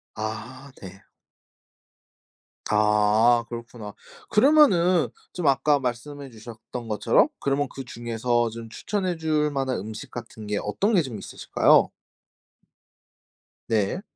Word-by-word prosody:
아 120 Hz, +6 st, -6 dB
네. 95 Hz, +1 st, -11 dB, 1.7 s
아 105 Hz, +3 st, +3 dB
그렇구나. 115 Hz, -3 st, -8 dB, 0.4 s
그러면은 190 Hz, -, +4 dB, 0.2 s
좀 175 Hz, -4 st, -2 dB
아까 140 Hz, +1 st, +3 dB
말씀해 135 Hz, +3 st, -5 dB
주셨던 115 Hz, +1 st, -9 dB
것처럼 105 Hz, +2 st, +3 dB
그러면 140 Hz, 0 st, 0 dB
그중에서 120 Hz, -2 st, -2 dB
좀 115 Hz, 0 st, -9 dB
추천해 185 Hz, -, -3 dB
줄 155 Hz, -2 st, 0 dB
만한 135 Hz, -2 st, -1 dB
음식 110 Hz, +2 st, -8 dB
같은 110 Hz, -3 st, -9 dB
게 105 Hz, 0 st, -1 dB
어떤 200 Hz, -, 0 dB
게 180 Hz, -, +5 dB
좀 125 Hz, -7 st, -6 dB
있으실까요? -, -, +2 dB, 1.8 s
네. 110 Hz, -, 0 dB
120 Hz, 220 characters per minute, -25 LUFS, 110-145 Hz, 1.8 s, 게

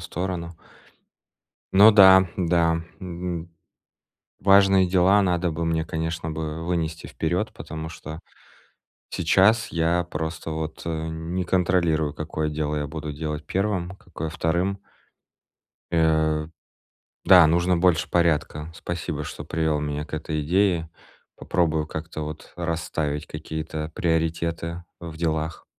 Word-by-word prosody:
сторону. 90 Hz, -1 st, -4 dB, 1.2 s
Ну 105 Hz, +3 st, +8 dB
да, 95 Hz, -2 st, +8 dB
да, 85 Hz, -2 st, +2 dB, 0.2 s
н 85 Hz, -2 st, -5 dB, 0.9 s
важные 95 Hz, -1 st, +5 dB
дела 95 Hz, +3 st, +4 dB
надо 90 Hz, -2 st, +1 dB
бы 80 Hz, +2 st, -3 dB
мне, 80 Hz, -1 st, 0 dB
конечно 80 Hz, 0 st, -3 dB
бы, 80 Hz, +1 st, -4 dB
вынести 85 Hz, -2 st, -2 dB
вперёд, 90 Hz, +7 st, -2 dB
потому 80 Hz, -9 st, -7 dB
что 80 Hz, -1 st, -8 dB, 0.9 s
сейчас 100 Hz, +6 st, +3 dB
я 85 Hz, +1 st, +1 dB
просто 80 Hz, 0 st, -5 dB
вот, 80 Hz, 0 st, -5 dB
э, 80 Hz, -1 st, -3 dB
не 80 Hz, +3 st, -3 dB
контролирую, 85 Hz, -4 st, +1 dB
какое 80 Hz, 0 st, -3 dB
дело 75 Hz, 0 st, -2 dB
я 75 Hz, -1 st, -2 dB
буду 75 Hz, -1 st, -5 dB
делать 75 Hz, 0 st, -5 dB
1, 95 Hz, -2 st, -1 dB
какое 80 Hz, -4 st, -7 dB
2. 85 Hz, +4 st, -1 dB, 1.1 s
Э, 80 Hz, -2 st, +2 dB, 0.8 s
да, 90 Hz, -4 st, +8 dB
нужно 85 Hz, +2 st, +2 dB
больше 85 Hz, -1 st, +2 dB
порядка. 80 Hz, -2 st, 0 dB
Спасибо, 80 Hz, -3 st, -4 dB
что -, -, -7 dB
привёл 80 Hz, -2 st, 0 dB
меня 75 Hz, 0 st, -3 dB
к 75 Hz, -, -16 dB
этой 80 Hz, 0 st, -2 dB
идее. 85 Hz, 0 st, +1 dB, 0.5 s
Попробую 80 Hz, -3 st, 0 dB
как-то 80 Hz, 0 st, -6 dB
вот 75 Hz, +1 st, -7 dB
расставить 80 Hz, -2 st, -3 dB
какие-то 80 Hz, 0 st, -5 dB
приоритеты 85 Hz, +1 st, -1 dB, 0.2 s
в 85 Hz, -2 st, -8 dB
делах. 80 Hz, -1 st, -2 dB
80 Hz, 120 wpm, -24 LUFS, 80-90 Hz, 1.2 s, Ну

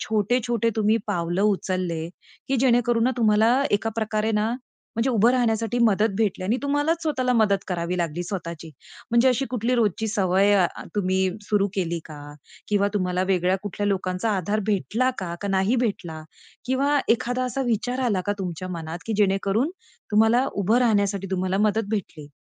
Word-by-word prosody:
छोटे, 220 Hz, +3 st, +1 dB
छोटे 230 Hz, -1 st, +1 dB
तुम्ही 215 Hz, +1 st, +3 dB
पावलं 175 Hz, +2 st, -1 dB
उचलले, 185 Hz, -5 st, -1 dB, 0.4 s
की 270 Hz, -, +1 dB
जेणेकरून 240 Hz, -2 st, +3 dB
ना 255 Hz, -, +3 dB
तुम्हाला 215 Hz, -1 st, +3 dB
ना 270 Hz, +2 st, +3 dB
एका 225 Hz, +2 st, 0 dB
प्रकारे 220 Hz, 0 st, -1 dB
ना, 210 Hz, +1 st, +1 dB, 0.5 s
म्हणजे 240 Hz, +3 st, +1 dB
उभं 230 Hz, +1 st, +4 dB
राहण्यासाठी 230 Hz, -2 st, 0 dB
मदत 215 Hz, -1 st, +3 dB
भेटली 200 Hz, -4 st, 0 dB
आणि 225 Hz, +6 st, +1 dB
तुम्हालाच 290 Hz, +4 st, 0 dB
स्वतःला 260 Hz, -5 st, 0 dB
मदत 215 Hz, -4 st, +3 dB
करावी 175 Hz, 0 st, -2 dB
लागली 170 Hz, 0 st, -2 dB
स्वतःची. 170 Hz, -3 st, -6 dB, 0.4 s
म्हणजे 235 Hz, +2 st, +4 dB
अशी 255 Hz, +2 st, +1 dB
कुठली 250 Hz, 0 st, 0 dB
रोजची 220 Hz, -2 st, +1 dB
सवय 200 Hz, -1 st, +3 dB, 0.4 s
तुम्ही 190 Hz, -2 st, +1 dB, 0.3 s
सुरू 205 Hz, -1 st, +2 dB
अ, -, -, -9 dB
केली 170 Hz, -3 st, -1 dB
का? 150 Hz, -2 st, -10 dB, 0.5 s
किंवा 205 Hz, -1 st, +2 dB
तुम्हाला 180 Hz, -2 st, 0 dB
वेगळ्या 185 Hz, 0 st, +2 dB
कुठल्या 205 Hz, 0 st, -3 dB
लोकांचा 190 Hz, +2 st, -1 dB
आधार 205 Hz, +4 st, -1 dB
भेटला 215 Hz, -, +1 dB
का, 175 Hz, -3 st, -4 dB
का 200 Hz, -, -3 dB
नाही 195 Hz, +5 st, +2 dB
भेटला? 165 Hz, -7 st, -4 dB, 0.4 s
किंवा 280 Hz, +3 st, +2 dB
एखादा 250 Hz, +2 st, +1 dB
असा 265 Hz, +2 st, -2 dB
विचार 245 Hz, +3 st, -1 dB
आला 200 Hz, -5 st, +1 dB
का 205 Hz, -, +1 dB
तुमच्या 185 Hz, -1 st, -5 dB
मनात, 165 Hz, -1 st, -5 dB
की 225 Hz, -, -2 dB
जेणेकरून 200 Hz, -, +1 dB, 0.4 s
तुम्हाला 225 Hz, +5 st, +4 dB
उभं 205 Hz, +4 st, +2 dB
राहण्यासाठी 200 Hz, -5 st, +1 dB
तुम्हाला 185 Hz, +1 st, -1 dB
मदत 215 Hz, 0 st, -1 dB
भेटली? 160 Hz, -8 st, -4 dB
210 Hz, 165 wpm, -24 LUFS, 185-235 Hz, 0.5 s, उभं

